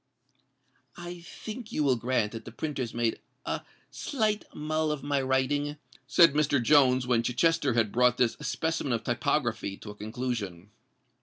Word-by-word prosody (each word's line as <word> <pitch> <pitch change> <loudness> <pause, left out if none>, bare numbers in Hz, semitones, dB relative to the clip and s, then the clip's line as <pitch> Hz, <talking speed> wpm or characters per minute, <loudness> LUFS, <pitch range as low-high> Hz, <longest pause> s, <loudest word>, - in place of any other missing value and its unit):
"I 175 0 -7
think 215 +6 -8
you 155 - 0
will 135 -3 +3
grant 120 -3 0
that 115 -1 -8
the - - -8
printers 130 -2 -3
made 115 -1 0 0.3
a - - -2 0.3
slight 215 -6 -1
mull 155 +1 -1
of 150 -3 -4
my 145 -1 +1
writing?" 140 +3 0 0.3
said 165 0 +6
Mr. 145 -2 +2
Jones, 130 -1 +4
when 120 -2 +2
Chichester 135 +3 +2
had 110 -3 +2
brought 125 0 +3
this 120 -2 +2
specimen 160 -2 -1
of 115 - -1
typography 120 -5 -1
to 105 - -9
a - - -12
conclusion. 105 -4 -4
130 Hz, 155 wpm, -28 LUFS, 115-150 Hz, 0.3 s, said